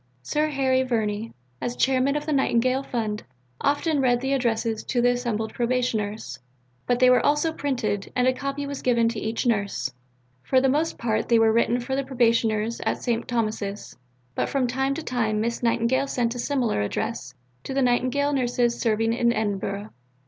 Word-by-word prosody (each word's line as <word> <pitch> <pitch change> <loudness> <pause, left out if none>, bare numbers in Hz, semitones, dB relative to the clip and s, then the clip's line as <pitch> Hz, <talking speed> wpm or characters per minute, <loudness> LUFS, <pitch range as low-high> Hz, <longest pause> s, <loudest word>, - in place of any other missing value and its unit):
Sir 300 - 0
Harry 265 -2 +2
Verney, 225 -3 -1 0.3
as 245 - -2
chairman 265 +2 +2
of 295 - -2
the 310 - -1
Nightingale 255 -1 +2
Fund, 220 -5 -3 0.4
often 290 +1 +1
read 245 -2 +3
the 265 +2 -1
addresses 230 -4 0
to 245 - -1
the 245 +1 +4
assembled 235 -3 -2
Probationers, 220 - -1 0.5
but 245 - +2
they 255 0 +5
were 250 0 +5
also 295 +2 +2
printed, 235 -10 -2
and 250 0 +2
a 255 - +4
copy 275 +2 -4
was 280 -1 -5
given 235 -2 +3
to 230 -2 -4
each 220 +3 -2
nurse. 200 - 0 0.5
For 260 - +3
the 265 +1 +2
most 305 +5 0
part 225 -2 -1
they 235 - +5
were 225 -1 +4
written 235 +1 +2
for 255 +2 -3
the 275 - 0
Probationers 230 -3 +1
at - - -1
St. 235 -2 -1
Thomas's, 215 -4 -3 0.4
but - - -1
from 275 -2 +1
time 265 +3 0
to 325 - -5
time 225 -6 0
Miss 235 +2 -2
Nightingale 240 +3 +1
sent 240 -3 0
a 245 - -6
similar 245 - 0
address 130 - -3 0.3
to - - -6
the 275 - +2
Nightingale 255 +4 +1
Nurses 245 -2 +1
serving 225 0 +1
in 235 0 +2
Edinburgh. 205 -1 -2
240 Hz, 180 wpm, -25 LUFS, 220-265 Hz, 0.5 s, they